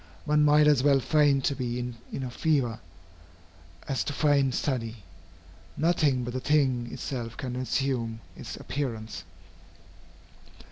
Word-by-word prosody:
One 150 0 +3
might 150 0 +6
as 150 -4 +5
well 140 0 +4
feign 145 +1 +3
to 140 - +1
be 125 -2 -3
in 125 +2 -6
a 125 - -4
fever, 130 -6 0 1.1
as 135 - 0
to 145 - -3
feign 140 -2 +3
study. 120 -4 -2 0.8
Nothing 150 -6 +2
but 120 0 -5
the 130 - -1
thing 130 -4 +1
itself 120 -4 -5
can 125 -2 -4
assume 125 -3 -1 0.2
its - - -7
appearance. 115 -6 -4
130 Hz, 130 wpm, -28 LUFS, 120-145 Hz, 1.1 s, might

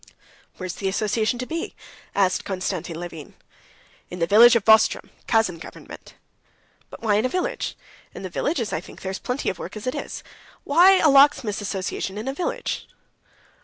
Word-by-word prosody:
"Where 185 - -6
is 180 - -4
the 195 - -2
association 215 +4 0
to 250 - -4
be?" 330 +5 -5 0.4
asked 190 -2 +2
Konstantin 180 -3 -4
Levin. 170 -3 -9 0.7
"In 180 - -7
the 165 - +1
village 230 +7 +7
of 225 - +1
Vozdrem, 220 0 +4 0.2
Kazan 220 -7 +1
government." - - -12 0.7
"But - - -12
why 210 -2 +3
in 215 - +1
a - - +1
village? 435 - -3 0.4
In - - -8
the - - -3
villages, 235 - -2
I - - -1
think, - - -14
there 190 - -3
is 190 - -5
plenty 250 +2 -3
of - - -12
work - - -7
as 210 - -8
it 255 - -1
is. - - -6 0.4
Why 360 +6 +6
a 325 - +4
locksmiths' 275 -7 +4
association 195 0 -4
in 215 +4 -5
a 270 - -1
village?" 350 - -3
215 Hz, 180 wpm, -23 LUFS, 190-260 Hz, 0.7 s, village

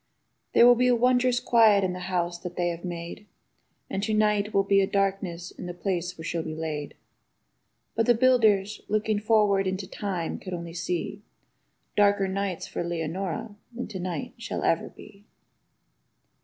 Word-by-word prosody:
|76| - - -48
There - - +7
will 245 - +9
be 250 +1 +2
a 250 - +5
wondrous 250 +1 +3
quiet 220 -4 +5
in 185 -1 0
the 180 - -6
house 175 -1 -2
that 175 0 -7
they 175 -1 0
have 170 0 -6
made. 175 +3 -6 0.6
And 195 - -3
to 215 +1 0
night 210 -1 +2
will 195 - +3
be 195 0 +4
a 190 - +1
darkness 190 -3 -1
in 180 - -8
the 175 - -6
place 180 -1 -2
where 160 - -8
she'll 170 0 -2
be 155 0 -5
laid; 155 -2 -4 1.0
But 225 0 0
the 240 - +6
builders, 220 -5 +3
looking 215 0 0
forward 210 -3 +3
into 190 +1 -2
time, 185 -4 -3
could 185 -1 -5
only 170 -1 -7
see 175 +3 -3 0.7
Darker 200 -1 +3
nights 190 -1 -2
for - - -4
Leonora 175 +6 -3 0.2
than 240 +1 -5
to 190 - -6
night 185 +8 -4
shall 230 - -4
ever 165 - +1
be. 200 0 -15
195 Hz, 175 wpm, -26 LUFS, 175-215 Hz, 1.0 s, will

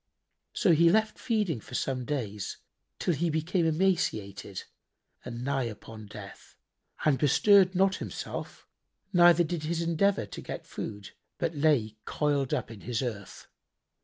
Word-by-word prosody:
So 185 - +3
he 165 +2 +6
left 220 +4 +2
feeding 210 - 0
for - - -10
some 130 -2 -1
days, 110 -9 -3 0.4
till 175 - 0
he 165 +3 0
became 165 +2 +1
emaciated 110 - -1 0.6
and 120 0 -6
nigh 135 -1 0
upon 110 -1 -8
death 100 -2 -11 0.5
and 145 -4 +3
bestirred 185 +6 +5
not 190 +1 +3
himself - - -6 0.5
neither 175 -1 +7
did 170 0 -3
his 165 +1 -1
endeavour 170 - +2
to 100 - -8
get - - -7
food, 100 -2 -7 0.3
but 170 -1 -1
lay 140 -8 +2
coiled 145 -3 0
up - - -1
in 105 -3 -10
his 120 +1 -2
earth. 105 -6 -6
150 Hz, 140 wpm, -29 LUFS, 115-175 Hz, 0.6 s, neither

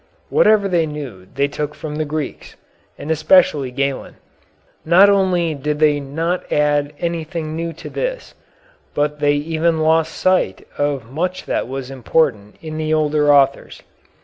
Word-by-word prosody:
Whatever 210 -2 +4
they 170 -4 +1
knew 135 -12 -8
they 140 +1 +2
took 150 +1 -4
from 150 -1 -6
the 155 - -1
Greeks, 150 -1 -5 0.4
and 155 - -5
especially 155 -3 +3
Galen. 135 +1 -3 0.7
Not 185 +5 +6
only 180 -4 +1
did 150 +1 -3
they 150 -1 +3
not 165 +6 -3
add 145 0 +1
anything 165 -2 -3
new 165 +1 -3
to 160 - -10
this, - - -4 0.6
but 150 0 -1
they 145 0 +3
even 160 +2 0
lost 160 +1 +2
sight 185 - +1
of 140 -5 -2
much 180 +6 -3
that - - -2
was 135 0 -6
important 125 -5 0
in 155 -1 -6
the 155 0 -2
older 150 -1 +2
authors. 140 -1 +2
155 Hz, 150 wpm, -19 LUFS, 145-165 Hz, 0.7 s, Not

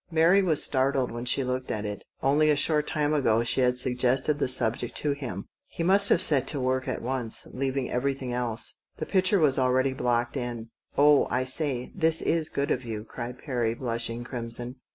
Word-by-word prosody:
Mary 170 +4 +4
was 165 -6 0
startled 130 -1 +1
when 120 +1 -6
she 130 +2 +1
looked 125 0 -3
at 105 -1 -3
it. 105 0 -5 0.2
Only 150 +3 +3
a 150 - +4
short 150 +1 +1
time 150 0 0
ago 115 -6 +2
she 120 - +1
had 125 0 +2
suggested 130 +4 0
the - - +1
subject 120 -2 0
to 150 - -1
him. 125 -9 -5 0.2
He 165 - -5
must 200 +3 +4
have - - +3
set 135 -3 +3
to 145 - -2
work 130 0 -1
at - - -3
once, 125 -2 -1
leaving 135 0 -2
everything 130 0 -2
else. 120 -2 -2 0.2
The - - -4
picture 190 +1 +3
was 145 -4 +3
already 130 +1 +2
blocked 120 -1 -1
in. 120 -3 -5 0.3
"Oh, 145 0 +5
I 130 - 0
say, 130 -1 -1
this 165 -3 +2
is 160 -2 0
good 140 0 -2
of 130 - -1
you," 110 -3 -5
cried 120 +2 -7
Perry, 120 -5 -2
blushing 115 -1 -3
crimson. 120 +1 -3
130 Hz, 195 wpm, -27 LUFS, 120-145 Hz, 0.3 s, Oh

